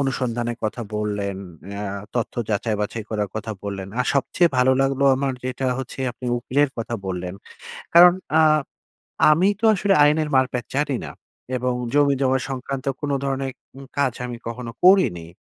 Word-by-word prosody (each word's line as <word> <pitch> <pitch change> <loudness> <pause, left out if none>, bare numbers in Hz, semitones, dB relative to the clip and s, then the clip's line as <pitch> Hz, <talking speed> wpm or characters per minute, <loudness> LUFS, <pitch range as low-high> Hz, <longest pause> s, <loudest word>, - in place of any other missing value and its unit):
অনুসন্ধানের 120 -3 -1
কথা 115 +2 -2
বললেন, 100 -2 -2 0.3
অ্যা 100 +1 -5 0.3
তথ্য 120 -3 -2 0.2
যাচাই-বাছাই 105 +1 -2
করার 105 -2 -1
কথা 110 0 -4
বললেন। 100 -2 -5
আর 125 - 0
সবচেয়ে 170 +5 +2
ভালো 130 +1 +5
লাগলো 135 0 +1
আমার 135 0 -1
যেটা 130 +1 -2
হচ্ছে, 130 +1 -6
আপনি 125 +1 -8
উকিলের 140 +3 +1
কথা 115 +1 -3
বললেন। 90 0 -4 0.6
কারণ 175 +1 +9 0.3
আ - - +7 0.9
আমি 175 +6 +4
তো - - -4
আসলে 195 +1 +2
আইনের 150 +1 +2
মার-প্যাচ 130 -2 +1
জানি 140 -2 +1
না। - - -8 0.5
এবং 125 0 -1 0.2
জমি-জমা 140 -2 +3
সংক্রান্ত 135 +1 -4
কোনো 145 -1 -1
ধরনের 135 -1 -2 0.2
উম 135 - -10
কাজ 135 -4 +2
আমি 120 -1 -6
কখনো 115 0 -6
করিনি। 180 - +5
130 Hz, 150 wpm, -22 LUFS, 110-140 Hz, 0.9 s, কারণ